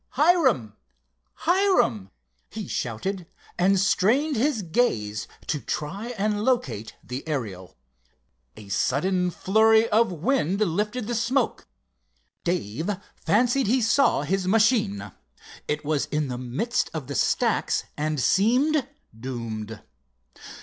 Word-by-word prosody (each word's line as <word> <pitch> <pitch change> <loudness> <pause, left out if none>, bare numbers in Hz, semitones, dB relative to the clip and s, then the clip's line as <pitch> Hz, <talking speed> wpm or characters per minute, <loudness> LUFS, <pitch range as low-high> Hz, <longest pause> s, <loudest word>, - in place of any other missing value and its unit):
"Hiram! 270 - +3 0.7
Hiram!" 345 - +2 0.4
he - - -6
shouted, 175 - -3 0.3
and 190 +2 +4
strained 240 +11 +2
his 245 -2 +1
gaze 115 - 0 0.2
to 150 - -1
try 195 +10 -4
and 210 +1 0
locate 245 - -1
the 125 +2 -5
Ariel. 105 - -5 0.8
A 100 - -12
sudden 180 - +1
flurry 220 +5 +3
of 225 -1 +3
wind 195 - 0
lifted 210 +5 -1
the 240 - -3
smoke. 235 +4 0 0.8
Dave 165 - -2 0.3
fancied 245 +3 +2
he 250 +5 +3
saw 235 - +3
his 185 +4 -1
machine. 215 -1 +2 0.6
It 150 0 -2
was 150 -1 0
in 150 -2 -1
the 125 -1 -4
midst 190 - -1
of 155 -4 -4
the 140 - -6
stacks - - +1
and 150 0 -2
seemed 250 - +2 0.3
doomed. 110 -3 -6
195 Hz, 115 wpm, -25 LUFS, 140-235 Hz, 0.8 s, and